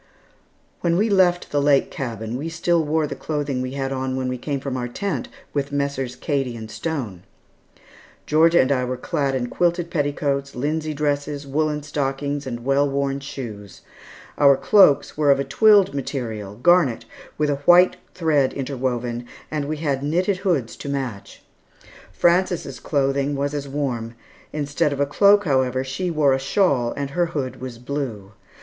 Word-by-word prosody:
When 170 -1 +1
we 210 +3 +2
left 180 -2 +3
the 145 - +1
lake 140 -1 +3
cabin, 115 -3 -4
we 150 +6 -4
still 170 0 +1
wore 155 +1 +1
the - - -4
clothing 145 -4 -3
we 130 +1 -4
had 135 -1 -3
on 130 -1 -2
when 130 -1 -2
we 125 - -3
came 140 +2 -3
from 135 -1 -4
our 125 -1 -2
tent 160 - -3 0.3
with 140 -1 -2
Messrs. 140 -3 -2
Cady 135 -5 -2
and 110 -1 -8
Stone. 125 - -4 1.0
Georgia 165 +3 +4
and 130 - +1
I 130 -2 +2
were 125 0 -3
clad 140 -1 -1
in 125 -2 -1
quilted 175 +5 0
petticoats, 140 -2 -1
linsey 155 +4 -2
dresses, 145 0 -2
woollen 150 +1 -1
stockings, 145 0 -2
and 120 -1 -6
well 140 +1 +2
worn 140 0 -1
shoes. 115 -8 -8 0.6
Our 140 -2 +6
cloaks 145 -8 +4
were 150 -2 +2
of 140 -1 +5
a - - +1
twilled 200 +5 +4
material, 115 -7 -4
garnet, 140 -1 +3 0.3
with 150 -1 +1
a 140 - -1
white 180 +1 +7 0.2
thread 150 -6 +2
interwoven, 125 -3 -3 0.2
and 150 -2 -2
we 155 +2 -3
had 145 -4 -1
knitted 180 +7 0
hoods 160 - -1
to 140 - -6
match. 125 -8 -5 0.7
Frances' 175 - +1
clothing 140 0 0
was 140 +1 -2
as 145 -1 -4
warm; 125 -5 -3 0.4
instead 145 +1 0
of 140 0 -1
cloak, 205 +5 +5
however, 130 -3 +1
she 135 +8 -3
wore 150 -4 +3
a 135 - +1
shawl, 135 -5 +1
and 140 -1 -3
her 175 +2 +1
hood 130 -3 -4
was 130 -2 -6
blue. 120 -6 -5
140 Hz, 165 wpm, -22 LUFS, 130-155 Hz, 1.0 s, white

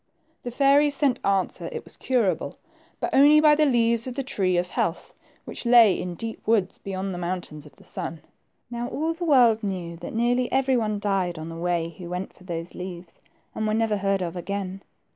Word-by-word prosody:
The 245 - -5
fairies 280 +3 +3
sent 275 -3 +1
answer 195 - 0
it 470 - -6
was - - -8
curable, 240 -8 0 0.4
but - - -3
only 290 +3 +7
by 305 -1 +6
the 305 0 +3
leaves 235 -2 +2
of 250 - -5
the 275 - -2
tree 185 -8 0
of 180 +1 -1
health, - - -2 0.3
which - - -8
lay 235 -4 +7
in 180 0 -4
deep 225 +4 -6
woods 215 -5 +1
beyond 190 0 -4
the 175 - -5
Moun 180 +1 -2
tains 150 -2 -11
of - - -19
the - - -19
Sun. 170 -4 -5 0.5
Now 240 0 -3
all 320 +6 -2
the 345 +1 -5
world 245 -7 +5
knew 180 -5 -4
that 175 +5 -8
nearly 245 +2 +1
every 265 0 +2
one 215 -3 0
died 195 -4 -1
on 160 +1 -6
the 165 - -7
way 170 -1 -1
who 175 -1 -7
went 180 +2 -5
for 185 - -19
those 170 -1 -5
leaves, 180 -2 -8 0.3
and 220 - -2
were 215 - +1
never 220 -2 +1
heard 195 -1 0
of 170 0 -4
again. 195 +1 -4
200 Hz, 210 wpm, -25 LUFS, 180-245 Hz, 0.5 s, only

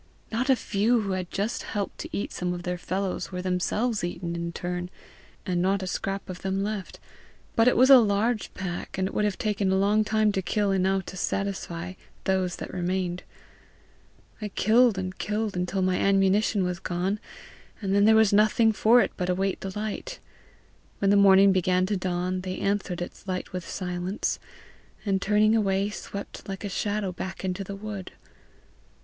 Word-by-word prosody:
Not 245 +4 -1
a 265 - +7
few 225 +1 +1
who 200 -2 -3
had 185 -2 -2
just 205 +4 -2
helped 205 -2 -4
to 325 - -5
eat 205 - -3
some 180 0 -2
of 175 - -7
their 180 0 -3
fellows, 190 +2 -3
were 180 0 -4
themselves 200 +5 0
eaten 175 -1 -3
in 170 0 -3
turn, 180 +1 -4 0.6
and 180 -3 0
not 190 +1 +1
a - - -2
scrap 195 +2 -3
of 180 -1 -7
them 195 +1 -1
left; 205 -2 -4 0.6
but 225 +1 +4
it 250 - +4
was 260 +3 +6
a 265 - +11
large 215 +1 +1
pack, 180 -2 -5
and 190 0 +1
it - - -7
would 210 - +1
have 205 -2 -1
taken 205 -3 0
a 190 - +3
long 205 +2 +3
time 215 0 +2
to 195 - -1
kill 205 +2 0
enough 190 0 +1
to 185 - -8
satisfy 185 -2 -3 0.3
those 185 -2 0
that - - -7
remained. 180 0 -1 1.2
I 210 - -2
killed 220 +2 +3
and 185 0 -3
killed 210 0 -2
until 180 +2 -1
my 185 0 +2
ammunition 195 +1 +3
was 180 -1 -2
gone, 185 +4 -2 0.6
and 195 -2 -1
then 200 +1 +5
there 220 +1 +6
was 220 -2 +5
nothing 215 +2 +4
for 230 +4 +5
it - - 0
but 180 0 -2
await 190 +1 0
the 190 +1 -5
light. 220 - -4 0.8
When 200 0 +2
the - - +5
morning 195 0 +7
began 185 0 +2
to 205 +2 -1
dawn, 185 0 -1
they 185 0 -4
answered 195 -3 -1
its 180 - -11
light 185 -1 -4
with 180 -2 -5
silence, 180 +2 -2 0.7
and 195 -2 +1
turning 210 +2 +3
away 200 -1 +1
swept 200 -1 -7
like 195 +1 -5
a 205 - -3
shadow 205 0 -1
back 190 +2 -6
into 185 +1 -2
the 195 +1 -6
wood. 200 -2 -7
195 Hz, 185 wpm, -26 LUFS, 185-210 Hz, 1.2 s, a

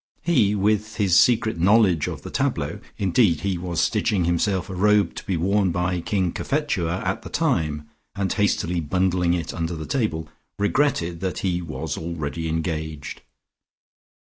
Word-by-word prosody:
He 120 -12 +3
with 105 +1 +2
secret 105 0 +3
knowledge 95 -4 +4
of - - -6
the - - -7
tableaux - - -1 0.2
(indeed 95 -3 +2
he 95 -3 -1
was 85 -2 -3
stitching 100 -6 +1
himself 90 +2 0
a 95 - -6
robe 105 +2 +3
to - - -8
be 95 - 0
worn 95 +3 +2
by 90 +1 -1
King 95 -1 0
Cophetua 95 - -1
at - - -1
the - - -9
time 75 -1 0 0.3
and 100 -1 -1
hastily 90 -4 +1
bundling 90 +2 +1
it 85 -2 -4
under 85 0 -3
the 80 -1 -6
table) 105 - -1 0.3
regretted 100 - +1
that 95 +1 -3
he 90 -1 0
was 80 -2 -4
already 80 -1 -4
engaged. 80 -2 -4
90 Hz, 150 wpm, -23 LUFS, 85-100 Hz, 0.3 s, knowledge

